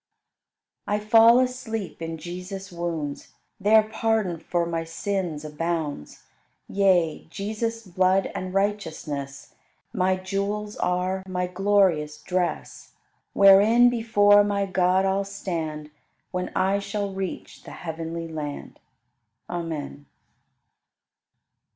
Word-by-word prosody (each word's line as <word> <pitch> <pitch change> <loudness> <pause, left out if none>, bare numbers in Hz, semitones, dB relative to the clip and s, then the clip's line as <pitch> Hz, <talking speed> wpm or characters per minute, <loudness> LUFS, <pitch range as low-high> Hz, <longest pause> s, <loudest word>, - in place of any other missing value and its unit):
34. 210 0 -1
I - - -18
fall 230 +2 +7
asleep 245 -8 -3
in 165 0 -4
Jesus' 185 +3 -7
wounds, 165 -4 -4 0.3
There 215 +2 +5
pardon 215 -5 -1
for 170 +1 -1
my 165 -1 -2
sins 165 -2 -3
abounds; 155 - -4 0.4
Yea, 185 -5 +2
Jesus' 220 +4 -4
blood 185 +1 +2
and 185 0 -4
righteousness 160 -8 -3 0.4
My 185 -3 +2
jewels 200 +3 -3
are, 185 +1 0
my 180 -1 -1
glorious 180 -5 +1
dress, 180 +2 -3 0.4
Wherein 210 +5 +7
before 205 -3 +5
my 200 -1 0
God 185 0 +2
I'll 195 +1 +1
stand 165 -6 -5 0.4
When 180 0 -2
I 190 +2 +2
shall 200 0 -3
reach 190 -2 -6
the - - -12
heavenly 165 0 -5
land. 150 -3 -6 0.7
Amen. 155 -5 -5
185 Hz, 105 wpm, -25 LUFS, 165-205 Hz, 0.7 s, fall